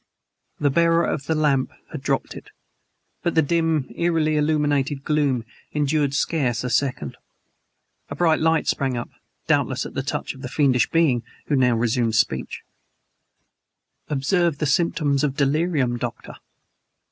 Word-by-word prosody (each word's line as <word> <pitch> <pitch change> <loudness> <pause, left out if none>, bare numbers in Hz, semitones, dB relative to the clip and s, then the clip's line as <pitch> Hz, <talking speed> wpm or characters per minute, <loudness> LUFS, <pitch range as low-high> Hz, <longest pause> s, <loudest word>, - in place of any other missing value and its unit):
The 145 -1 +2
bearer 170 +2 +3
of 140 -2 -3
the 160 - +1
lamp 145 -4 +1 0.2
had - - -6
dropped - - -1
it, - - -11 0.7
but 170 - -1
the 160 - +5
dim, 160 -2 +1
eerily 165 -3 +1
illuminated 145 -2 +1
gloom 140 -6 0 0.3
endured 145 -1 +1
scarce 130 -6 0
a 125 - -3
second. 125 - -1 0.9
A - - -5
bright 165 -3 +2
light 160 0 +2
sprang 130 -3 0
up 120 - -5 0.3
doubtless - - +1
at - - -8
the - - -2
touch - - -3
of 130 - -13
the 125 - -6
fiendish 135 -4 +2
being 155 -8 +2 0.3
who 145 - +3
now 125 -3 +3
resumed 115 0 0
speech: 105 - -1 1.5
"Observe 155 +3 +1
the 150 - -1
symptoms 145 -2 +1
of 140 -3 0
delirium, 140 -3 +1
Doctor!" 120 -1 -6
145 Hz, 145 wpm, -23 LUFS, 130-160 Hz, 1.5 s, the